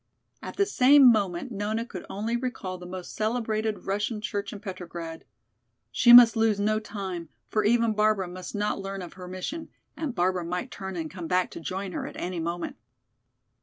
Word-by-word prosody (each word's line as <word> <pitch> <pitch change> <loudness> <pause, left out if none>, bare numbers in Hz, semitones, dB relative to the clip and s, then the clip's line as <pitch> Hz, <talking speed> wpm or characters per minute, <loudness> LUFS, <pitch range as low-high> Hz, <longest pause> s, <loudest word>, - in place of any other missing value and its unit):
At - - -7
the 400 - +4
same 275 -7 +7
moment 200 +1 -1
Nona 215 +2 -2
could 190 -7 -9
only 220 +4 -2
recall 235 -7 -4
the 180 - -9
most 180 0 -7
celebrated 220 -1 -1
Russian 210 +3 -1
church 205 -1 -3
in 205 - -8
Petrograd. 175 -5 -7 0.7
She 240 - +5
must 240 -1 +10
lose 220 -2 +2
no 215 +1 +2
time, 190 -6 -6 0.2
for 215 - +1
even 230 +1 +3
Barbara 210 -3 +2
must 180 +3 -8
not 210 0 -1
learn 195 -1 -5
of 175 - -9
her 180 -1 -10
mission, 185 - -5 0.3
and 300 -7 -4
Barbara 180 0 +1
might 180 +2 -4
turn 190 -1 -6
and 160 -2 -4
come 180 -3 -6
back 180 +1 +1
to - - -7
join 190 +3 -4
her - - -4
at - - -9
any 180 -1 -3
moment. 170 +1 -4
200 Hz, 185 wpm, -27 LUFS, 180-225 Hz, 0.7 s, must